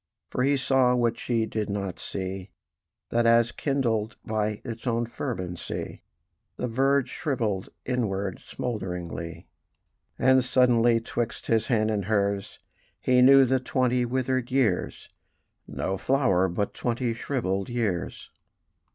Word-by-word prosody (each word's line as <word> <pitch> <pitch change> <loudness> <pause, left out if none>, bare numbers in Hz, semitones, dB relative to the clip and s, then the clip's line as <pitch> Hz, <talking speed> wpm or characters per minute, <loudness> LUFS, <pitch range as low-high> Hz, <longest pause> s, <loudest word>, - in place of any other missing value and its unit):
For - - -1
he 140 +2 +3
saw 130 -1 +3
what 120 -1 +1
she 115 -2 0
did 110 -1 -3
not 100 -3 -3
see, 95 0 -5 0.6
That 120 0 +3
as 115 0 +5
kindled 115 -6 -1
by 105 -1 -1
its 115 0 -6
own 120 0 +1
fervency 95 -8 -5 0.6
The 125 - -2
verge 135 +3 +2
shrivelled 115 - -2 0.2
inward 100 -6 -1
smoulderingly: 90 -7 -5 0.7
And 130 0 +4
suddenly 120 -2 +4
'twixt 115 0 -3
his 115 -1 +1
hand 110 -3 +2
and 100 -3 -1
hers 100 -1 0 0.4
He 125 0 +3
knew 135 +1 +8
the 130 +1 +2
twenty 125 -1 +1
withered 130 0 -1
years 125 -9 0 0.6
No 95 +1 -3
flower, 110 -9 +2
but 95 +3 -2
twenty 120 0 -1
shrivelled 100 -6 -2
years. 110 -8 -2
115 Hz, 125 wpm, -26 LUFS, 100-125 Hz, 0.7 s, knew